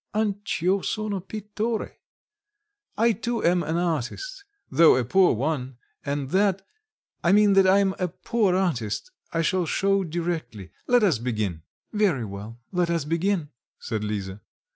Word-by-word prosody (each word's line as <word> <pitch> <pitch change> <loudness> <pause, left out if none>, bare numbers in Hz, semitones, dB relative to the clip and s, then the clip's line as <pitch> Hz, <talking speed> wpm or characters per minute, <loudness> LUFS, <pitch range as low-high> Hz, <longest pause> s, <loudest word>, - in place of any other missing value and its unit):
Anch 205 -4 -1
'io 190 +2 +3
sono 215 -1 -2
pittore. 210 +3 -4 1.0
I 230 +2 +4
too 235 +1 -3
am 175 +1 +3
an 160 +1 -1
artist, 175 - -3 0.3
though 165 -5 +6
a 125 -1 +1
poor 185 +3 +4
one 130 -1 -2 0.3
and 140 -1 -3
that 195 0 +2 0.6
I 170 - +4
mean 205 0 +5
that 195 -1 +5
I'm 195 0 +4
a 180 - +1
poor 200 +2 0
artist, 170 - -1 0.2
I 165 -1 0
shall 180 +1 +1
show 195 +2 +2
directly. 160 - -4 0.2
Let 245 -2 +4
us 175 - +3
begin." 105 -9 -2 0.3
"Very 190 - +1
well, 105 +3 -8
let 180 -2 +1
us 165 -4 0
begin," 165 0 0 0.3
said 110 -2 -4
Lisa. 100 -2 -4
175 Hz, 145 wpm, -25 LUFS, 135-200 Hz, 1.0 s, though